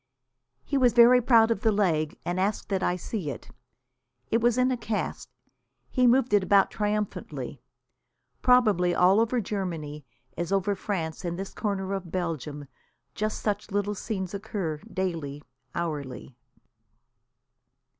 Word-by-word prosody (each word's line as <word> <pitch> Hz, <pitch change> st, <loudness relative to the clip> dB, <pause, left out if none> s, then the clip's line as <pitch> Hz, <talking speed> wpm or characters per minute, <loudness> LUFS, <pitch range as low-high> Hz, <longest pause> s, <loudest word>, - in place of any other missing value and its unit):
He 280 Hz, -, 0 dB
was 250 Hz, -2 st, +4 dB
very 240 Hz, +1 st, +7 dB
proud 230 Hz, -2 st, +5 dB
of 220 Hz, -, 0 dB
the 220 Hz, -, +3 dB
leg, 165 Hz, -7 st, +1 dB
and 175 Hz, +1 st, -1 dB
asked 200 Hz, +3 st, -1 dB
that 195 Hz, -2 st, 0 dB
I 180 Hz, -, +1 dB
see 180 Hz, -2 st, -4 dB
it. 135 Hz, -, -8 dB, 0.8 s
It 230 Hz, -, +3 dB
was 240 Hz, +1 st, +3 dB
in 255 Hz, +1 st, +3 dB
a -, -, +1 dB
cast. 215 Hz, -2 st, -3 dB, 0.6 s
He 255 Hz, -1 st, +3 dB
moved 250 Hz, -1 st, +3 dB
it 205 Hz, -, +6 dB
about 195 Hz, +1 st, +4 dB
triumphantly. 185 Hz, -, -3 dB, 0.8 s
Probably 210 Hz, -9 st, +4 dB
all 185 Hz, +3 st, +5 dB
over 230 Hz, +2 st, +2 dB
Germany, 170 Hz, -8 st, -4 dB, 0.3 s
as 175 Hz, +1 st, -3 dB
over 195 Hz, +1 st, +1 dB
France 180 Hz, -5 st, -4 dB
and 175 Hz, -1 st, -3 dB
this 195 Hz, +1 st, -6 dB
corner 195 Hz, -2 st, -2 dB
of 185 Hz, -4 st, -5 dB
Belgium, 155 Hz, -5 st, -3 dB, 0.5 s
just 215 Hz, +1 st, -2 dB
such 210 Hz, 0 st, -2 dB
little 205 Hz, 0 st, -1 dB
scenes 190 Hz, -2 st, -4 dB
occur 195 Hz, -6 st, -3 dB
daily, 165 Hz, -7 st, -3 dB, 0.3 s
hourly. 145 Hz, -6 st, -4 dB
195 Hz, 140 wpm, -27 LUFS, 170-220 Hz, 0.8 s, very